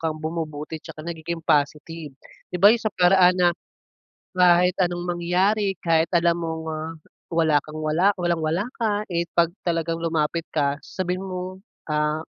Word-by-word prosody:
kang 160 -1 -2
bumubuti 155 -1 -5
tsaka 155 +1 -10
nagiging 170 0 -5
positive, 150 +1 0 0.4
di 180 - -4
ba, 200 +5 +7
yun 235 - 0
sa 215 - 0
paraan 180 0 +5
na 175 -1 +4 0.8
kahit 180 0 +5
anong 175 0 -1
mangyari, 185 +3 +1
kahit 165 -1 +2
alam 170 -1 +3
mong, 160 -1 -4
ah, 160 +1 -5 0.4
wala 160 -3 +3
kang 155 0 -8
wala 170 +7 +2
walang-wala 170 +1 0
ka, 210 -2 0
eh, 170 0 0
'pag 170 -1 +3 0.2
talagang 165 -1 0
lumapit 165 0 -1
ka 145 -1 +1
sasabihin 185 +1 -4
mo, 185 0 -5 0.3
ah, 150 +1 0
170 Hz, 150 wpm, -24 LUFS, 160-180 Hz, 0.8 s, ba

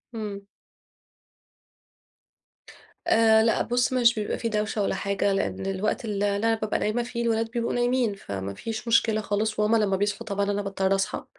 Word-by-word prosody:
إمم. 210 -3 -5 2.7
آآ، 220 -1 +5
لأ، 225 - +2
بُصّ، 245 +1 +1
مش 240 -2 +4
بيبقى 210 -1 -2
في 230 - -2
دوشة 210 0 -1
ولا - - 0
حاجة، 200 0 0
لأن 195 0 -2
الوقت 195 +4 -2
ال 215 - -3
اللي 200 -1 +1
أنا 225 +2 +2
بابقى 215 -1 -2
نايمة 220 +3 0
فيه 235 0 -4
الولاد 225 -1 0
بيبقوا 235 0 -1
نايمين، 245 -2 +1
فما 100 - -6
فيش 225 - -6
مشكلة 225 -1 +3
خالص، 210 +1 -1
وهُم 210 +2 +3
لما 210 -3 +2
بيصحوا 205 +1 -2
طبعًا 200 -1 0
أنا 205 0 -1
باضطر 195 -1 0
أصحى. 195 0 -2
215 Hz, 170 wpm, -26 LUFS, 200-230 Hz, 2.7 s, آآ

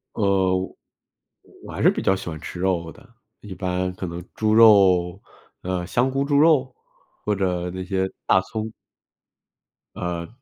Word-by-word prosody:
呃， 95 -3 +2 1.1
我 - - -10
还 - - -4
是 - - +6
比 - - -4
较 95 - +3
喜 95 -1 -7
欢 80 -2 -6
吃 90 - -8
肉 90 -3 -1
的， 130 - -19 0.3
一 105 -3 -9
般 90 0 -2
可 95 - -5
能 85 0 -7
猪 110 0 +1
肉 95 -5 +5 0.4
呃， 90 -1 -3
香 125 +8 +1
菇 135 +1 -1
猪 140 0 +1
肉 145 -5 +3 0.5
或 105 - +1
者 90 -2 -1
那 95 +1 -6
些 95 0 -1 0.2
大 95 - +4
葱。 110 +2 -5 1.2
呃， 85 -1 -4
95 Hz, 165 characters per minute, -23 LUFS, 90-110 Hz, 1.2 s, 是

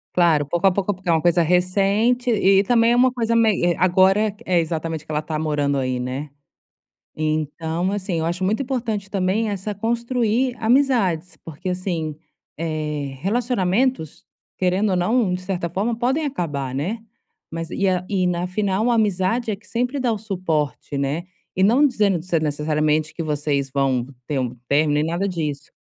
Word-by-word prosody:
Claro, 165 -5 +4
pouco 175 +6 +1
a - - +5
pouco 200 +2 0
porque 185 0 -14
é - - +4
uma 160 -1 +3
coisa 175 0 +3
recente 195 +8 +2
e 195 -3 +4
também 230 +2 +3
é 240 - +4
uma 250 0 +4
coisa 230 -2 0
mei 225 -5 +3
eh, 175 -1 +3
agora 190 +4 +4
que 210 +3 -12
é 180 -2 +3
exatamente 160 -1 -3
que - - -8
ela 150 0 0
tá 155 0 -4
morando 145 -2 0
aí, 130 -2 -1
né? 135 +4 -4 0.9
Então 155 +3 -1
assim, 190 -4 -2
acho 175 +3 -2
muito 215 +8 +1
importante 230 -6 -3
também 200 +3 0
essa 205 +1 -4
construir 235 +2 0
amizades, 225 - +2
porque 165 +3 -6
assim, 175 -4 -3 0.4
eh, 150 -3 -3
relacionamentos 220 - 0 0.3
querendo 185 +3 +1
ou 185 - +2
não, 205 +3 +2
de 180 - -2
certa 180 -2 -2
forma 210 +7 -1
podem 260 +6 0
acabar, 145 - -3
né. 195 - -3 0.5
Mas 165 0 -5
e 195 - 0
a 180 -1 +1
e 190 -3 +1
na 180 0 0
final 195 +2 0
uma 240 -1 +3
amizade 215 +2 +1
é - - -1
que 210 - -23
sempre 250 +4 -1
dá 250 -2 +1
o 220 - -1
suporte, 170 -9 -2
né. 140 +5 -2 0.3
E 185 - 0
não 240 +9 +5
dizendo 210 -8 +2
de 165 - -9
ser 170 -3 0
necessariamente 150 +1 0
que - - -5
vocês 145 -3 -1
vão 135 -3 0 0.2
ter 145 0 -1
um 125 -1 -3
término, 145 +1 +2
nem 150 - +2
nada 170 +4 -1
disso, 155 -5 -4
185 Hz, 180 wpm, -22 LUFS, 155-215 Hz, 0.9 s, a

